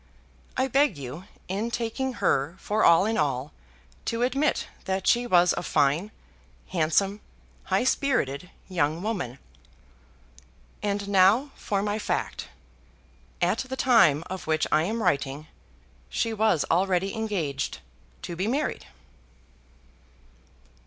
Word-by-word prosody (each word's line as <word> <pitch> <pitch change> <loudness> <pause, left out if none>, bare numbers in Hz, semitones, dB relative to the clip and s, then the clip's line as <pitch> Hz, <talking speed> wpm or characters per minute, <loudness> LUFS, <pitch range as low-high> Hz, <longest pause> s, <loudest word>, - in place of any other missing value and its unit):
I 260 +1 +2
beg 270 - +2
you, 140 +6 -7 0.2
in 205 +5 -2
taking 240 +3 -2
her 165 - 0
for 215 +2 -1
all 170 +3 +6
in 220 -2 0
all, 140 -1 -1 0.5
to 230 +1 -1
admit 275 +4 +1 0.2
that 190 -1 -2
she 245 0 +3
was 175 -4 +5
a - - -2
fine, 155 +4 +1 0.6
handsome, 190 +5 +1 0.4
high - - +1
spirited 180 - 0 0.2
young 165 -2 0
woman. 180 - -3 1.4
And 200 -1 -2
now 200 +8 +4
for 200 -1 -2
my 210 +1 -1
fact. - - -3 1.0
At - - +2
the 265 0 -4
time 200 - +5
of 185 -3 -6
which 155 0 +2
I 155 +2 +3
am 220 +4 -2
writing 140 +2 0 0.6
she 230 -1 -1
was 220 -7 +2
already 185 +2 +1
engaged 175 - -2 0.5
to 170 - -5
be 185 +4 -1
married. 280 +6 -2
195 Hz, 120 wpm, -26 LUFS, 155-225 Hz, 1.4 s, all